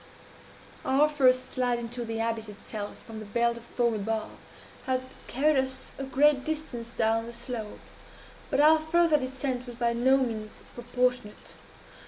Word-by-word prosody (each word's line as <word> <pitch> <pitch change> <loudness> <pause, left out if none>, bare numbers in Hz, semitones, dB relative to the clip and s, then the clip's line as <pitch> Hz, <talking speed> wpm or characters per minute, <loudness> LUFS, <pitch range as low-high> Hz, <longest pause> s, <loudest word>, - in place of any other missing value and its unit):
"Our 275 +3 +4
first 255 -3 +3
slide 250 -2 +1
into 240 +1 -5
the 225 -1 -4
abyss 225 -1 -2
itself, 205 0 -7
from 225 -1 -8
the 215 - -8
belt 235 +3 +1
of 235 - -10
foam 235 0 0
above, 220 +1 -2 0.6
had 255 0 +1 0.2
carried 290 +3 +2
us 260 0 -7
to - - -7
a - - -3
great 275 +1 +4
distance 295 -7 -4
down 225 0 +1
the 235 - -8
slope; 235 -2 -5 0.7
but 270 - +1
our 310 +2 +7
farther 315 0 +3
descent 260 -1 -3
was 240 - -7
by 235 -1 +1
no 260 +3 +4
means 225 -5 -3
proportionate. 245 -2 -2
245 Hz, 160 wpm, -28 LUFS, 230-265 Hz, 0.7 s, our